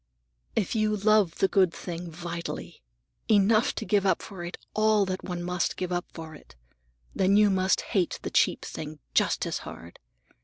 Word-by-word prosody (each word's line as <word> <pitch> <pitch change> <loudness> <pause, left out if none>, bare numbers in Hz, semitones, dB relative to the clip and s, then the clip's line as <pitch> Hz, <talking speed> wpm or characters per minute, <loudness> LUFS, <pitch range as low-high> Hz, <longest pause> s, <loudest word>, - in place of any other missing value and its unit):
"If 190 - 0
you 215 -1 +1
love 210 -4 +3
the 195 - +2
good 190 -3 +3
thing 175 0 -6
vitally, 170 - -6 0.5
enough 215 +2 +4
to 220 - -4
give 205 -3 +2
up 195 - +1
for 185 -3 -8
it 175 - -6 0.2
all 215 -1 +3
that 185 0 -4
one 175 -1 -4
must 180 0 -1
give 180 -1 -3
up 175 0 -1
for 160 -1 -9
it, 150 - -15 0.6
then 195 +1 +3
you 210 -1 +5
must 190 0 +2
hate 185 -4 0
the - - -4
cheap - - +2
thing 155 0 -7 0.2
just - - +2
as - - -2
hard. 85 +1 -10
185 Hz, 180 wpm, -27 LUFS, 175-210 Hz, 0.6 s, you